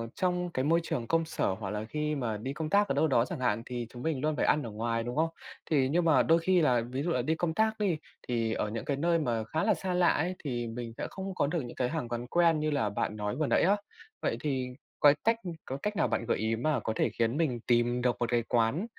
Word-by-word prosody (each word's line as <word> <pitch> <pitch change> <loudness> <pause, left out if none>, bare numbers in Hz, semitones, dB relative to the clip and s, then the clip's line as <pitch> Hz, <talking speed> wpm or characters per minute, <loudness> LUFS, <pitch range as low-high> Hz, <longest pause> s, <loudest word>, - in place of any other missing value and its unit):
trong 180 -1 0
cái 130 -5 -1
môi 165 +3 +4
trường 120 -7 -3
công 165 0 +2
sở 160 - -1
hoặc 95 0 -5
là 105 +1 -3
khi 150 +5 -2
mà 115 -6 -2
đi 130 +6 -4
công 155 +1 -4
tác 205 +2 +4
ở - - 0
đâu 155 +3 +3
đó 120 -5 +3
chẳng 165 +2 -5
hạn 115 -3 +1
thì 120 -2 -4
chúng 120 - -10
mình 155 -5 -1
luôn 155 0 0
phải - - +1
ăn 150 - +3
ở 115 - -5
ngoài, 115 +2 -1
đúng 120 +1 -4
không? 160 +2 +2 0.4
Thì 135 -4 +2
nhưng 170 +4 +2
mà 145 -7 +5
đôi 165 +1 +4
khi 180 +1 +3
là 125 -5 +3
ví 130 +4 -4
dụ 175 - -1
là 125 - +1
đi 155 +6 0
công 160 0 -1
tác 220 +4 +1
đi, 190 -6 +1 0.3
thì 115 -2 0
ở 105 - -1
những 115 +2 -4
cái 140 - -1
nơi 170 +3 +2
mà 120 -7 0
khá 155 - -2
là 215 0 +4
xa 185 +2 -3
lạ 180 -1 +4
ấy, 175 +4 +1
thì 120 -5 -2
mình 115 0 -6
sẽ - - -3
không 190 0 -6
có 145 - +1
được 165 +1 -1
những 120 - -8 0.2
hàng 155 -6 -2
quán 120 0 -4
quen 165 +2 +3
như 155 0 0
là 135 -8 +1
bạn 105 +1 -2
nói 105 +1 -3
vừa 150 +2 0
nãy - - +3
á, 195 +4 +5 0.5
vậy - - 0
thì 135 -4 -1 0.3
cói 145 0 +7
cách 225 +1 +3 0.3
có 135 - -4
cách 210 +9 -3
nào - - +2
bạn 115 - -1
gợi 115 - +1
ý 110 +1 0
mà 150 +6 0
có 110 - -2
thể - - +2
khiến 115 +4 +2
mình 135 -8 0
tìm 120 0 +2
được 125 -1 +2
một 120 - 0
cái 120 -1 +2
quán, 120 - +2
140 Hz, 280 wpm, -30 LUFS, 120-165 Hz, 0.5 s, cói